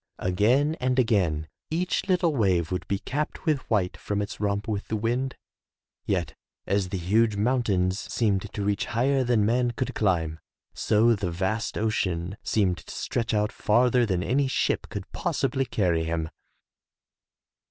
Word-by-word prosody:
Again 120 Hz, -, +2 dB
and 130 Hz, 0 st, 0 dB
again, 95 Hz, -11 st, +2 dB, 0.2 s
each 175 Hz, +4 st, -1 dB
little 175 Hz, -4 st, +2 dB
wave 95 Hz, -8 st, +2 dB
would 90 Hz, -, -3 dB
be 100 Hz, -, 0 dB
capped 145 Hz, -, -4 dB
with 155 Hz, -4 st, +2 dB
white 100 Hz, -5 st, +1 dB
from 100 Hz, 0 st, -3 dB
its 100 Hz, 0 st, -4 dB
romp 100 Hz, +1 st, -1 dB
with 105 Hz, -2 st, -3 dB
the 110 Hz, -, -2 dB
wind. 120 Hz, +5 st, -1 dB, 0.7 s
Yet, 90 Hz, -4 st, 0 dB, 0.3 s
as 100 Hz, -2 st, 0 dB
the 95 Hz, -, -2 dB
huge 105 Hz, +5 st, +2 dB
moun 125 Hz, +5 st, +2 dB
tains 95 Hz, -3 st, 0 dB
seemed 105 Hz, -3 st, 0 dB
to 105 Hz, -, -4 dB
reach 100 Hz, 0 st, 0 dB
higher 135 Hz, +2 st, +3 dB
than 120 Hz, -4 st, +2 dB
man 120 Hz, +2 st, +2 dB
could 130 Hz, -, -2 dB
climb, 85 Hz, -6 st, 0 dB, 0.3 s
so 115 Hz, +2 st, +3 dB
the 100 Hz, -4 st, -2 dB
vast 95 Hz, +7 st, -2 dB
ocean 95 Hz, -4 st, -1 dB
seemed 95 Hz, -5 st, +1 dB
to -, -, -11 dB
stretch 115 Hz, -2 st, -2 dB
out 105 Hz, 0 st, +1 dB
farther 120 Hz, +3 st, +3 dB
than 90 Hz, -3 st, 0 dB
any 135 Hz, +5 st, +1 dB
ship 130 Hz, -, 0 dB
could -, -, -5 dB
possibly 135 Hz, 0 st, -1 dB
38 -, -, -14 dB
THROUGH 105 Hz, -, +2 dB
FAIRY 85 Hz, -2 st, +3 dB
HALLS 80 Hz, -, -1 dB
carry -, -, -2 dB
him. 80 Hz, -, -6 dB
105 Hz, 175 wpm, -26 LUFS, 95-125 Hz, 0.7 s, higher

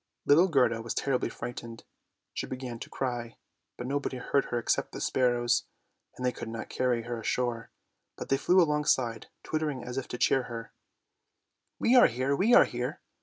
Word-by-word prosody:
Little 165 Hz, +6 st, +6 dB
Gerda 125 Hz, -8 st, +2 dB
was 115 Hz, -, -4 dB
terribly 135 Hz, -2 st, 0 dB
frightened, 115 Hz, -1 st, -7 dB, 0.6 s
and -, -, -7 dB
began 125 Hz, -2 st, -5 dB
to -, -, -8 dB
cry, 120 Hz, -3 st, -4 dB, 0.4 s
but 125 Hz, -, -5 dB
nobody 140 Hz, 0 st, -2 dB
heard 135 Hz, +2 st, 0 dB
her 120 Hz, -, -2 dB
except 120 Hz, -, 0 dB
the -, -, -5 dB
sparrows, 120 Hz, -2 st, +1 dB, 0.5 s
and 125 Hz, -, -3 dB
they 125 Hz, -, +2 dB
could 115 Hz, -, -7 dB
not 115 Hz, 0 st, -6 dB
carry 125 Hz, -2 st, 0 dB
her 120 Hz, 0 st, -4 dB
ashore, 120 Hz, 0 st, -2 dB, 0.5 s
but -, -, -7 dB
they 135 Hz, -, +3 dB
flew 180 Hz, +6 st, +4 dB
alongside 150 Hz, -8 st, +1 dB, 0.2 s
twittering 150 Hz, -5 st, -2 dB
as 125 Hz, +2 st, -3 dB
if 135 Hz, -, -7 dB
to -, -, -5 dB
cheer 130 Hz, +1 st, +2 dB
her, 115 Hz, -1 st, -7 dB, 0.5 s
" -, -, -53 dB
We 240 Hz, -, +3 dB
are 250 Hz, -, +8 dB
here, 130 Hz, +4 st, 0 dB
we 200 Hz, +10 st, +2 dB
are -, -, +8 dB
here." -, -, -4 dB
125 Hz, 180 wpm, -29 LUFS, 120-140 Hz, 0.6 s, are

